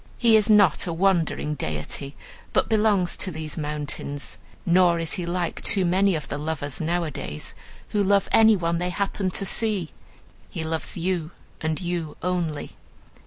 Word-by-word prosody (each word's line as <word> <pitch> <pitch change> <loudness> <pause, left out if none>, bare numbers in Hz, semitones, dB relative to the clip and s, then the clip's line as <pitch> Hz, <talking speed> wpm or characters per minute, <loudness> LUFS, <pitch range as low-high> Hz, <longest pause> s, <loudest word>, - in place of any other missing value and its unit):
He 230 -3 +5
is 215 0 +4
not 205 -8 +5
a 170 - -1
wandering 170 -4 +1
deity, 130 - -4 0.4
but - - +2
belongs 210 -5 +2
to 190 - -1
these 155 -3 -5
mountains. 150 -2 -4 0.3
Nor 175 -1 +4
is 165 -1 -3
he 175 -2 -3
like 175 0 -2
too 195 -3 +3
many 190 +2 +3
of 150 - -4
the 145 - -4
lovers 150 -2 -3
nowadays, 160 - -3 0.4
who 210 - +1
love 200 0 +3
any 220 -1 +7
one 170 -2 0
they 180 +1 -1
happen 195 +1 -1
to 195 - -1
see; 205 -6 0 0.6
he 160 - -4
loves 160 +2 -2
you, 170 -2 -1 0.3
and 160 0 -1
you 175 -4 -3
only. 170 -5 -2
170 Hz, 160 wpm, -25 LUFS, 155-190 Hz, 0.6 s, any